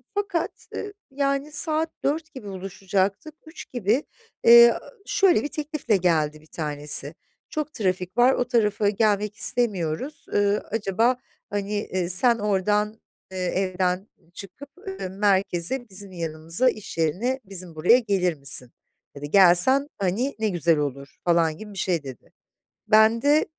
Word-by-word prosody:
fakat, 395 Hz, -5 st, -1 dB, 0.2 s
ııı, 410 Hz, -1 st, -6 dB, 0.2 s
yani 275 Hz, +1 st, -1 dB
saat 315 Hz, +1 st, +1 dB
16.00 315 Hz, +3 st, -2 dB
gibi 260 Hz, -7 st, -10 dB
buluşacaktık. 195 Hz, -, -3 dB
15.00 315 Hz, +1 st, -11 dB
gibi, 240 Hz, +3 st, 0 dB, 0.4 s
eee, 235 Hz, 0 st, +8 dB, 0.3 s
şöyle 385 Hz, -, +3 dB
bir -, -, -2 dB
teklifle 295 Hz, -8 st, -1 dB
geldi 155 Hz, -4 st, 0 dB
bir 155 Hz, -, -21 dB
tanesi: 150 Hz, -1 st, -1 dB, 0.3 s
Çok 305 Hz, -1 st, -4 dB
trafik 185 Hz, -3 st, -2 dB
var, 250 Hz, +2 st, +5 dB
o 250 Hz, -, 0 dB
tarafa 210 Hz, -4 st, +1 dB
gelmek 210 Hz, 0 st, 0 dB
istemiyoruz, 215 Hz, -, 0 dB
ııı, 205 Hz, 0 st, +1 dB
acaba, 225 Hz, +4 st, +1 dB, 0.3 s
hani, 205 Hz, 0 st, -3 dB
eee, 185 Hz, -4 st, -2 dB
sen 235 Hz, +6 st, +3 dB
oradan, 210 Hz, +2 st, 0 dB, 0.3 s
eee, 190 Hz, -, -7 dB
evden 185 Hz, +1 st, -1 dB, 0.3 s
çıkıp, 200 Hz, +10 st, -11 dB, 0.2 s
ııı, 385 Hz, -, -5 dB
merkeze, 195 Hz, +4 st, 0 dB
bizim 195 Hz, 0 st, -2 dB
yanımıza, 165 Hz, +6 st, 0 dB
iş 215 Hz, -7 st, -8 dB
yerine, 195 Hz, -, -1 dB
bizim 185 Hz, -3 st, -7 dB
buraya 180 Hz, +11 st, +4 dB
gelir 195 Hz, -6 st, 0 dB
misin? 140 Hz, -3 st, 0 dB, 0.4 s
Ya 140 Hz, -, -10 dB
da -, -, -5 dB
"Gelsen, 195 Hz, -, +6 dB
hani, 200 Hz, +9 st, -1 dB
ne 220 Hz, -1 st, 0 dB
güzel 170 Hz, -3 st, +1 dB
olur." 140 Hz, -1 st, -5 dB
falan 165 Hz, -2 st, +2 dB
gibi 210 Hz, +1 st, -10 dB
bir -, -, -11 dB
şey 175 Hz, -5 st, -1 dB
dedi. 130 Hz, -3 st, -11 dB, 0.6 s
Ben 220 Hz, +1 st, +4 dB
de 295 Hz, +3 st, +3 dB
200 Hz, 140 wpm, -24 LUFS, 180-245 Hz, 0.6 s, eee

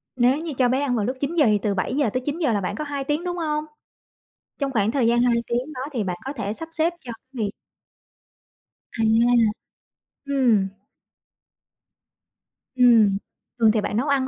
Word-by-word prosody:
Nếu 255 Hz, +3 st, +3 dB
như 320 Hz, -2 st, -5 dB
cho 250 Hz, -2 st, +3 dB
bé 260 Hz, +2 st, +1 dB
ăn 260 Hz, -4 st, 0 dB
vào 210 Hz, -3 st, 0 dB
lúc 255 Hz, +2 st, -3 dB
9:00, 300 Hz, +1 st, +2 dB
thì 210 Hz, -2 st, +3 dB
từ 205 Hz, -2 st, 0 dB
7:00-9:00 260 Hz, -, -1 dB
là 200 Hz, -, 0 dB
bạn 200 Hz, +3 st, -3 dB
có 305 Hz, -, -4 dB
2 285 Hz, -2 st, -4 dB
tiếng, 295 Hz, +5 st, -1 dB
đúng 355 Hz, 0 st, -3 dB
hông? 305 Hz, -2 st, -1 dB, 0.9 s
Trong 275 Hz, -2 st, -2 dB
khoảng 215 Hz, -2 st, +1 dB
thời 245 Hz, -3 st, +1 dB
gian 240 Hz, +1 st, +3 dB
2 245 Hz, -1 st, +3 dB
tiếng 245 Hz, +6 st, -2 dB
đó 255 Hz, -, -6 dB
thì 225 Hz, -6 st, -1 dB
bạn 180 Hz, -2 st, -3 dB
có 270 Hz, -, -4 dB
thể 205 Hz, -7 st, -4 dB
sắp 325 Hz, +8 st, -6 dB
xếp 330 Hz, +1 st, +1 dB
cho 240 Hz, -2 st, -8 dB
cái 255 Hz, +1 st, -8 dB
việc 200 Hz, -, -1 dB, 1.5 s
À. -, -, +2 dB, 1.2 s
Ừm. 240 Hz, -8 st, +3 dB, 2.1 s
Ừm, 230 Hz, -6 st, +5 dB, 0.4 s
thường 220 Hz, -2 st, +5 dB
thì 215 Hz, -1 st, +1 dB
bạn 210 Hz, -, -2 dB
nấu 270 Hz, +5 st, 0 dB
ăn 270 Hz, -2 st, +1 dB
255 Hz, 175 wpm, -23 LUFS, 225-285 Hz, 2.1 s, Ừm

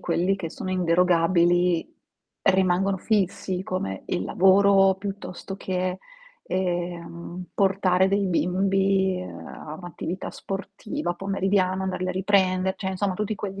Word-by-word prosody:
quelli 180 Hz, +3 st, +1 dB
che 180 Hz, -4 st, -5 dB
sono 185 Hz, -, -5 dB
inderogabili 175 Hz, 0 st, +2 dB, 0.5 s
rimangono 190 Hz, 0 st, +3 dB
fissi, 190 Hz, -2 st, -1 dB
come 185 Hz, -, -3 dB
il 90 Hz, +2 st, -2 dB
lavoro, 195 Hz, +1 st, +5 dB
piuttosto 195 Hz, -1 st, -6 dB
che, 185 Hz, -1 st, -2 dB, 0.4 s
ehm, 175 Hz, -1 st, -3 dB
portare 190 Hz, -1 st, +3 dB
dei 200 Hz, 0 st, +1 dB
bimbi 190 Hz, +1 st, +1 dB
a 155 Hz, -4 st, -9 dB
un'attività 175 Hz, +1 st, -6 dB
sportiva 200 Hz, +4 st, -4 dB
pomeridiana, 190 Hz, 0 st, 0 dB
andarli 185 Hz, -1 st, -2 dB
a -, -, +1 dB
riprende, 190 Hz, -1 st, +2 dB
cioè 190 Hz, -, -3 dB
insomma 190 Hz, 0 st, -1 dB
tutti 210 Hz, +2 st, -2 dB
quegli 200 Hz, -1 st, -5 dB
185 Hz, 115 wpm, -25 LUFS, 180-195 Hz, 0.5 s, lavoro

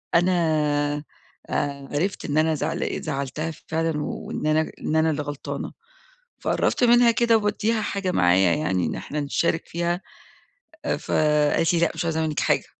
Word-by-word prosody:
أنا 175 Hz, +2 st, +4 dB, 1.2 s
آآ 140 Hz, -1 st, -2 dB
عرفت 185 Hz, +7 st, -1 dB
إن 150 Hz, 0 st, -1 dB
أنا 160 Hz, 0 st, +3 dB
زعل -, -, -2 dB
زعَّلتها 150 Hz, +2 st, -3 dB, 0.2 s
فعلًا 160 Hz, -1 st, -1 dB
وإن 150 Hz, -, -4 dB
أنا 155 Hz, +1 st, +2 dB
إن 155 Hz, -, -2 dB
أنا 160 Hz, 0 st, +3 dB
اللي 150 Hz, -1 st, -1 dB
غلطانة، 145 Hz, -1 st, -5 dB, 0.7 s
فقرَّبت -, -, +1 dB
منها 240 Hz, 0 st, +6 dB
كده 230 Hz, -1 st, +3 dB
وبادّيها 215 Hz, +1 st, 0 dB
حاجة 200 Hz, -2 st, -2 dB
معايا 90 Hz, -, +4 dB
يعني 95 Hz, -, 0 dB
أن -, -, -2 dB
إحنا 150 Hz, +1 st, -4 dB
نشارك 165 Hz, +3 st, 0 dB
فيها، 175 Hz, +1 st, -1 dB, 0.8 s
آآ -, -, 0 dB
فقالِت 150 Hz, +1 st, +2 dB
لي: 170 Hz, -, +2 dB
"لأ، 170 Hz, -, +3 dB
مش -, -, -3 dB
عايزة 160 Hz, -1 st, 0 dB
منِّك 155 Hz, -2 st, -1 dB
حاجة." -, -, +2 dB
160 Hz, 155 wpm, -24 LUFS, 145-175 Hz, 1.2 s, منها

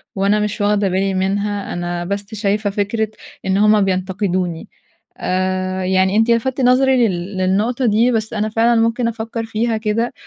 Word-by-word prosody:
وأنا 200 Hz, +2 st, +2 dB
مش 210 Hz, 0 st, -2 dB
واخدة 205 Hz, -1 st, +2 dB
بالي 190 Hz, +1 st, 0 dB
منها، 200 Hz, +2 st, -1 dB
أنا 175 Hz, 0 st, -3 dB
بس 200 Hz, +3 st, -4 dB
شايفة 205 Hz, 0 st, 0 dB
فكرة 205 Hz, +2 st, -1 dB, 0.4 s
إن 190 Hz, 0 st, +1 dB
هم 210 Hz, +1 st, +4 dB
بينتقدوني 185 Hz, -2 st, -1 dB, 0.5 s
آآ، 185 Hz, 0 st, -1 dB
يعني 190 Hz, +1 st, +2 dB
أنتِ 225 Hz, +2 st, +3 dB
لفتِّ 255 Hz, +3 st, 0 dB
نظري 255 Hz, -1 st, +4 dB
لل 185 Hz, +1 st, -4 dB
للنقطة 210 Hz, +7 st, 0 dB
دي، 230 Hz, +3 st, +3 dB
بس 220 Hz, -1 st, -1 dB
أنا 215 Hz, 0 st, -1 dB
فعلًا 230 Hz, +1 st, +2 dB
ممكن 230 Hz, +1 st, +1 dB
أفكّر 225 Hz, 0 st, -4 dB
فيها 225 Hz, +1 st, -1 dB
كده، 220 Hz, +3 st, -1 dB
205 Hz, 160 wpm, -18 LUFS, 190-225 Hz, 0.5 s, هم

